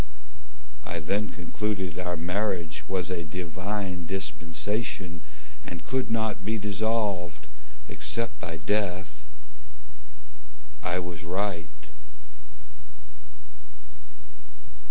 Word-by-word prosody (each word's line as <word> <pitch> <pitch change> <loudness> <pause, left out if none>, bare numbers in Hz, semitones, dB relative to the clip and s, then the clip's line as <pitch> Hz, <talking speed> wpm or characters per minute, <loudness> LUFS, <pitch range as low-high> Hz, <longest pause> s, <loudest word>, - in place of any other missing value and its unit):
I 85 +1 -2
then 100 +7 +2
concluded 95 -5 0
our 90 -1 +1
marriage 90 -2 +1
Was 95 -1 +1
a 85 -2 +1
divine 90 +2 -1
dispensation 90 0 -1 0.4
And 85 -2 -5
could 130 -1 +2
not 110 -3 +2
be 110 +3 +2
dissolved, 100 -5 +2 0.4
Except 115 -10 -2
by 80 0 -2
death. 95 +2 +1 1.6
I 85 0 +2
was 90 -2 -2
right. 90 0 +1
90 Hz, 80 wpm, -30 LUFS, 85-105 Hz, 1.6 s, then